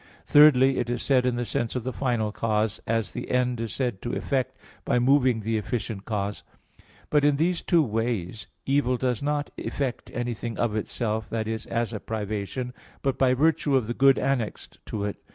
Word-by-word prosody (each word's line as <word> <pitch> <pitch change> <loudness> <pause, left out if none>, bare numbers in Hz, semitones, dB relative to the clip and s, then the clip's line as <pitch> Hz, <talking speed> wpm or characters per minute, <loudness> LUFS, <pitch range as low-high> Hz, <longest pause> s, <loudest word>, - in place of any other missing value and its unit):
Thirdly, 135 -3 +6
it 120 - -1
is 120 0 -2
said 130 -2 +3
in 125 - +1
the 120 0 -2
sense 115 +1 -2
of 125 - -2
the 130 +1 -3
final 120 -5 0
cause, 110 -1 -1
as 115 -6 0
the - - -5
end 125 -2 +1
is 115 - -3
said 125 -7 -2
to 120 - -4
effect 130 -1 -1 0.3
by - - +1
moving 125 -2 +3
the 110 +1 0
efficient 110 -2 -4
cause. 105 -2 -3 0.7
But 150 -1 +4
in 145 -1 +4
these 170 +4 +1
two 170 -3 +3
ways 110 -4 -2 0.2
evil 135 -2 +2
does 125 -3 -1
not 145 0 -1
effect 130 -3 -3
anything 120 -1 -3
of 115 -3 0
itself, 110 0 -2
that 110 -1 -2
is, 110 -1 -4
as 115 0 -1
a 105 - -3
privation, 110 +4 -4 0.3
but 135 -1 0
by 130 -1 +4
virtue 155 0 +2
of 130 -4 +2
the 120 - -2
good 135 +2 +5
annexed 130 -6 -2
to 105 -2 -3
it. 105 - -4
120 Hz, 190 wpm, -26 LUFS, 110-135 Hz, 0.7 s, Thirdly